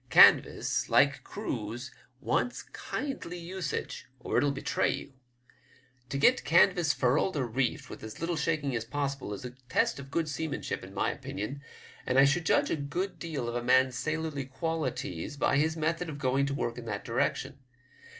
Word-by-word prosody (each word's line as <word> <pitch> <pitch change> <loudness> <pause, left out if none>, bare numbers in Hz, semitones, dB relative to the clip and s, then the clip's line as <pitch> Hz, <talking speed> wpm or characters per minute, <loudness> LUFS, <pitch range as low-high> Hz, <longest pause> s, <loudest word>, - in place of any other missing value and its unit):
Canvas, - - +6
like - - +4
crews, 120 +5 -5 0.3
wants 245 - 0
kindly 265 -11 -5
usage, 175 -2 -4
or - - -3
it'll 145 - +4
betray 135 0 0
you. 140 - -6 1.0
To 140 - -2
get 245 - +4
canvas 170 +1 +4
furled 150 +7 +1
or 135 - +1
reefed 130 +4 -1
with - - -9
as 110 -1 -8
little 170 +1 -1
shaking 150 -4 0
as 115 - -1
possible 140 -1 -3
is 105 +4 -6
a 125 - -5 0.2
test - - +2
of 135 -1 -9
good 160 +3 0
seamanship 150 -6 -3
in 95 +1 -11
my - - +1
opinion, 130 +8 -5 0.5
and 130 - +2
I 135 - +8
should 160 +4 +2
judge - - +3
a - - +2
good 165 +6 -3
deal 150 -8 -3
of 120 - -3
a 120 - -1
man's 130 +1 +4
sailorly 155 -1 -2
qualities 145 - -3
by 140 - +2
his 160 +2 +1
method 165 +2 -1
of 145 - -5
going 135 0 +1
to 140 - -2
work 120 -3 -2
in 120 - -9
that 105 -3 -4
direction. - - -1
140 Hz, 175 wpm, -30 LUFS, 130-160 Hz, 1.0 s, I